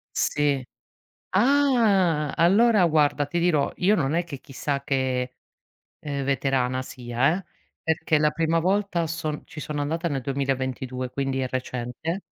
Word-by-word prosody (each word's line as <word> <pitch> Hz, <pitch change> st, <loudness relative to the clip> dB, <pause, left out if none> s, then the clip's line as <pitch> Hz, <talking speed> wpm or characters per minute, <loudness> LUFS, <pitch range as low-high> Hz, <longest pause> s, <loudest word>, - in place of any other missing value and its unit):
Sì. 145 Hz, -2 st, +1 dB, 0.7 s
Ah! 205 Hz, -, +3 dB
Allora 200 Hz, +5 st, +4 dB
guarda 145 Hz, -2 st, +2 dB
ti 170 Hz, +4 st, -2 dB
dirò, 170 Hz, -5 st, +2 dB
io 205 Hz, +4 st, +3 dB
non 145 Hz, -2 st, 0 dB
è 170 Hz, -, +2 dB
che 155 Hz, -6 st, -8 dB
chissà 140 Hz, +1 st, -4 dB
che, 130 Hz, -2 st, -1 dB, 0.7 s
ehm, 140 Hz, -2 st, -3 dB
veterana, 130 Hz, -1 st, 0 dB
sia, 125 Hz, +5 st, 0 dB
eh, 195 Hz, -, -8 dB, 0.5 s
perché 160 Hz, -1 st, +1 dB
la 150 Hz, 0 st, +3 dB
prima 165 Hz, +1 st, +1 dB
volta 185 Hz, 0 st, +1 dB
son 155 Hz, -2 st, -4 dB
ci 160 Hz, -, -10 dB
sono 150 Hz, 0 st, -3 dB
andata 165 Hz, +4 st, -1 dB
nel 140 Hz, -4 st, -2 dB
2022 130 Hz, -1 st, -2 dB
quindi 135 Hz, 0 st, -2 dB
è 130 Hz, -, 0 dB
recente 125 Hz, +7 st, -4 dB
150 Hz, 140 wpm, -25 LUFS, 135-170 Hz, 0.7 s, Allora